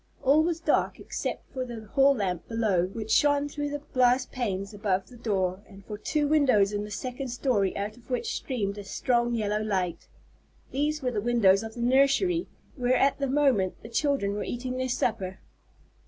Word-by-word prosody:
All 285 +4 +5
was 330 0 0
dark - - +1
except - - -5
for 260 - -2
the 235 -3 -7
hall 275 0 +5
lamp 185 -6 -2
below, 210 -6 +1
which 220 +2 -6
shone 285 0 +3
through 290 0 -4
the 290 0 -5
glass 255 0 +4
panes 200 -6 -3
above 195 -2 -1
the 250 - -13
door, 195 -5 -1
and 195 -1 -14
for 210 - -6
two 295 +8 -1
windows 255 -10 +3
in 205 0 -1
the 210 - -7
second 250 +5 -5
story 240 -5 0
out 210 +3 -4
of 245 - -20
which 440 - -1
streamed 205 -6 -3
a - - -6
strong 240 +3 0
yellow 210 -1 0
light. 190 -5 -2 0.6
These 295 +2 -1
were 250 - 0
the 210 -4 -1
windows 205 -4 +4
of 225 0 -7
the 240 - -5
nursery, 275 +8 +3 0.3
where, 250 -1 +1
at 275 +2 +2
that 275 -1 -1
moment, 260 -10 +2
the 225 - -9
children 255 -5 0
were 205 - -3
eating 250 +1 -4
their 255 0 -1
supper. 190 -6 -1
240 Hz, 190 wpm, -27 LUFS, 205-275 Hz, 0.6 s, All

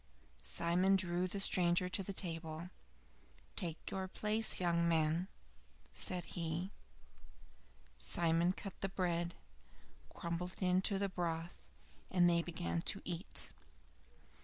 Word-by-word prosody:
Simon 180 +3 +3
drew 180 -1 0
the 200 +2 -3
stranger 180 -2 +4
to 185 - -1
the 195 - -4
table. 165 -2 -2 0.8
"Take 165 -3 -3
your 190 -1 -2
place, 215 +3 +3
young 170 -1 +2
man," 160 +2 +2 0.7
said 180 -1 +2
he. 170 +2 -3 1.3
Simon 170 - +3
cut 195 0 -7
the 195 - -1
bread, 175 -2 -1 0.8
crumbled 170 +2 -4
it - - -6
into 185 +2 +2
the 200 0 0
broth, 170 -2 -3 0.5
and 180 -1 +4
they 170 -1 +4
began 170 0 -3
to 200 - -1
eat. 175 +1 -1
175 Hz, 115 wpm, -37 LUFS, 170-185 Hz, 1.3 s, stranger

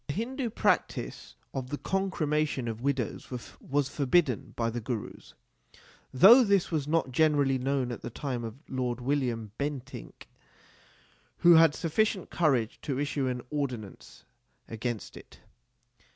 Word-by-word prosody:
The 140 - -2
Hindu 245 +4 -2
practice 205 - -1 0.2
of 130 -1 -4
the 145 - -3
concremation 155 -9 -1
of 115 0 -4
widows 130 -4 -2 0.3
was 140 0 0
forbidden 140 -3 +1
by 115 -1 -1
the 120 +1 -4
Gurus; 115 -2 -6 0.8
though 225 - +8
this 200 -5 +2
was 150 -4 -1
not 160 -4 +1
generally 140 -2 +3
known 130 -1 -1
at 120 - -6
the - - -5
time 125 -1 -4
of 115 -1 -6
Lord 125 -2 -2
William 120 -5 -1
Bentinck, 140 - -6 1.1
who 175 - +7
had 160 -2 +6
sufficient 190 +3 0
courage 135 -9 +1
to 135 -3 -3
issue 145 -2 -1
an 125 -1 -3
ordinance 125 -9 -5 0.4
against 115 0 -5
it. - - -14
140 Hz, 135 wpm, -29 LUFS, 120-155 Hz, 1.1 s, though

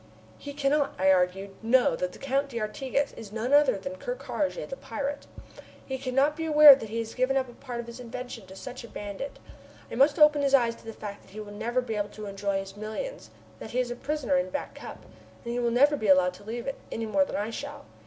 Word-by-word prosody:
"He 285 - -7
cannot," 285 0 +1
I 190 +1 +4
argued, 190 +2 +1
"know 235 -4 +4
that 180 +2 -2
the - - -12
Count 275 +1 -1
d'Artigas 260 +4 -2
is 215 -3 -10
none 230 +5 -2
other 290 -7 +5
than 275 +8 -6
Ker - - -4
Karraje, 305 - -3
the - - -5
pirate. 285 - -5 0.6
He 265 -1 -4
cannot 270 +3 +2
be 325 - -4
aware 300 -2 +10
that 225 -5 -3
he 225 - -4
has 225 -1 -3
given 255 +2 +1
up 260 -1 0
a 240 - -12
part 245 -1 -7
of 235 - -4
his 235 +1 -9
invention 245 -3 -7
to 190 - -11
such 255 +5 -8
a - - -9
bandit. 205 +6 -6 0.5
I - - -6
must 280 +4 +4
open 300 -1 +6
his 275 -1 +4
eyes 235 -3 +3
to - - -18
the 225 - -5
fact 205 -2 -8
that - - -20
he 215 - -7
will 210 -1 -7
never 235 +4 -1
be 240 -3 -4
able 205 -1 -1
to 215 +1 -9
enjoy 200 0 -2
his 195 0 -6
millions, 220 - -6 0.3
that - - -8
he 250 - -1
is 245 -1 0
a - - -3
prisoner 265 -7 0
in 180 +1 0
Back - - -4
Cup, - - -10 0.4
and 240 +1 -2
will 240 - +2
never 280 +5 +4
be 220 -7 -3
allowed 185 -1 +5
to 180 - -14
leave 235 +3 -5
it, 275 - -4
any 225 - -3
more 285 +7 +3
than - - -5
I 210 +2 -2
shall. - - -7
240 Hz, 245 wpm, -28 LUFS, 210-275 Hz, 0.6 s, aware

